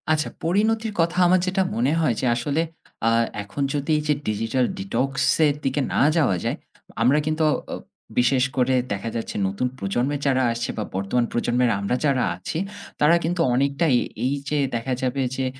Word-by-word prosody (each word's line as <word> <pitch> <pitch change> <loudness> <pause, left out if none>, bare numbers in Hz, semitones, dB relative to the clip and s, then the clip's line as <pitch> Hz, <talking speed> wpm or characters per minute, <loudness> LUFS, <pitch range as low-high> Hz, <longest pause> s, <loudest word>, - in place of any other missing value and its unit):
আচ্ছা। 155 -1 +1
পরিণতির 215 +5 +1
কথা 170 +2 +1
আমার 185 +1 +4
যেটা 190 +1 +1
মনে 125 +5 +1
হয় 150 -7 +2
যে - - -1
আসলে 140 +6 0 0.5
আ - - +5 0.3
এখন 100 +8 -6
যদি 145 +2 -1
এই - - -1
যে, 150 - +4
digital 115 +4 0
detox 190 -9 -1 0.4
এর 145 - +1
দিকে 135 +2 0
না - - +2 0.2
যাওয়া 140 - +3
যায়, - - -1 0.4
আমরা 130 +6 +4
কিন্তু 155 +1 -1
অ - - +2 0.2
অ - - -2 0.4
বিশেষ 125 +1 +3
করে 130 0 +3 0.2
দেখা 100 +3 -4
যাচ্ছে 115 - -4
নতুন 100 +6 -1
প্রজন্ম 120 +5 -1
এর 145 - -5
যারা 130 -1 +2
আসছে 115 0 -3
বা 110 - -1
বর্তমান 100 +6 0
প্রজন্মের 120 0 +1
আমরা 100 +4 0
যারা 135 -3 +2
আছি, 90 - -5 0.4
তারা 150 +3 +5
কিন্তু 170 +2 0
অনেকটাই 140 +3 +2 0.3
এই 130 - +1 0.2
যে 150 - 0 0.2
দেখা 115 +3 -2
যাবে 130 +1 -1
যে 130 - -1
135 Hz, 185 wpm, -23 LUFS, 120-155 Hz, 0.5 s, আ